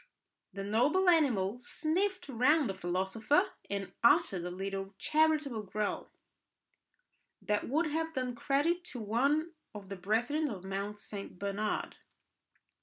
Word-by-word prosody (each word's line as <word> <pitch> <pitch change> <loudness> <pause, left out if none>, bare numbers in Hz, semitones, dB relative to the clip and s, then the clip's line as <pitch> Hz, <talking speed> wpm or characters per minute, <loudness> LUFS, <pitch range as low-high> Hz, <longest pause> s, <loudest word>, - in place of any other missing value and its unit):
The 195 - -5
noble 260 - +2
animal 245 - +3
sniffed 360 +8 -1
round 275 +3 +3
the 195 - -2
philosopher, 190 +8 +1 0.2
and 200 -1 -3
uttered 195 -6 +4
a - - -2
little 195 +1 -4
charitable 305 -6 +2
growl 210 +1 -3 1.3
that 210 +1 -1
would 310 +6 +2
have 320 +1 -2
done 255 -1 -1
credit 295 +8 +1
to 255 - -6
one 280 +10 +1 0.2
of 200 -2 -9
the 200 - -4
brethren 240 - 0
of 195 -6 -6
Mount 200 +2 -4
St. 200 -3 -7
Bernard. 200 +2 -2
230 Hz, 125 wpm, -32 LUFS, 195-305 Hz, 1.3 s, uttered